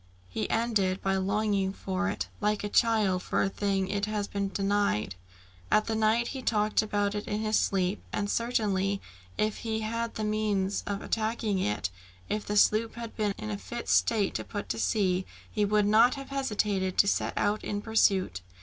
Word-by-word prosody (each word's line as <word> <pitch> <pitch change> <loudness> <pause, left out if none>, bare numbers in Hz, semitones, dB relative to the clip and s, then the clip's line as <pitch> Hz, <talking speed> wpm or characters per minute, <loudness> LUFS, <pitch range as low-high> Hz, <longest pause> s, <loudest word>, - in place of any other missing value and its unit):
He 110 +4 -3
ended 210 -5 +1
by 195 0 +1
longing 195 0 0
for 195 +1 -2
it, 205 - -3
like 210 -1 0
a 205 - -2
child 215 -5 +3
for - - 0
a 195 - +1
thing 195 -1 0
which 190 +1 -3
it 200 0 0
has 210 -1 -2
been 200 -1 -2
denied. 195 - 0 0.6
At 215 +1 +2
night 220 +2 +2
he 265 - -5
talked 210 -3 +2
about 205 -1 0
it 210 0 -4
in 210 +1 -2
his 215 0 +2
sleep, 190 0 0
and 205 - -1
certainly 205 -4 0 0.4
if 215 0 0
he 220 -1 -2
had 215 0 -3
had 230 0 -2
the 215 - -3
means 210 -2 0
of 200 0 -3
attacking 220 -2 -1
it, 105 - -1 0.4
if 210 - -1
the 210 - 0
sloop 220 +2 +3
had 230 -1 -7
been 210 -2 0
in 105 - -5
a 100 - -3
fit 90 0 -6
state 95 - +3
to - - -3
put 205 -2 -6
to 115 - -2
sea, 185 - +1 0.3
he 210 -1 +1
would 210 0 +3
not 225 +6 +5
have 275 -1 -8
hesitated 210 -8 -1
to 200 - +5
set - - +1
out 205 +1 +1
in 205 - -2
pursuit. 195 - +2
205 Hz, 195 wpm, -29 LUFS, 195-215 Hz, 0.6 s, not